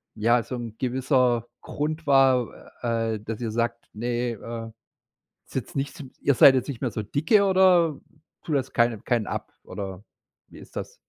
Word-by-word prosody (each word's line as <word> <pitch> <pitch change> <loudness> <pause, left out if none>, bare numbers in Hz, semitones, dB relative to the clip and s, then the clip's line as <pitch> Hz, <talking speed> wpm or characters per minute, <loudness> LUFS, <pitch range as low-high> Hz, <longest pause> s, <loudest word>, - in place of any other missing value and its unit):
ja, 115 +2 +3
so 125 - -6
'n 115 -3 -6
gewisser 125 -2 +1
Grund 155 +1 -4
war, 135 -3 +4 0.3
äh, 115 -2 0
dass 110 +1 -6
ihr 115 -2 -2
sagt: 115 +1 -2
„Ne, 120 +2 -2
äh, 115 +1 -6 0.8
ist - - -17
jetzt - - -4
nicht 140 +2 -2
s 140 - -7 0.2
ihr 140 - +3
seid 135 - +8
jetzt 130 - 0
nicht 135 -3 -6
mehr 125 -4 -1
so 110 - -3
dicke 160 - +2
oder 185 -5 +4 0.4
tut 155 - -1
das 130 -1 -2
keinem 115 -3 +1
keinen 120 -3 0
ab - - -5
oder 95 -1 -7 0.5
wie - - -13
ist - - -15
das? - - -5
120 Hz, 180 wpm, -25 LUFS, 115-140 Hz, 0.8 s, seid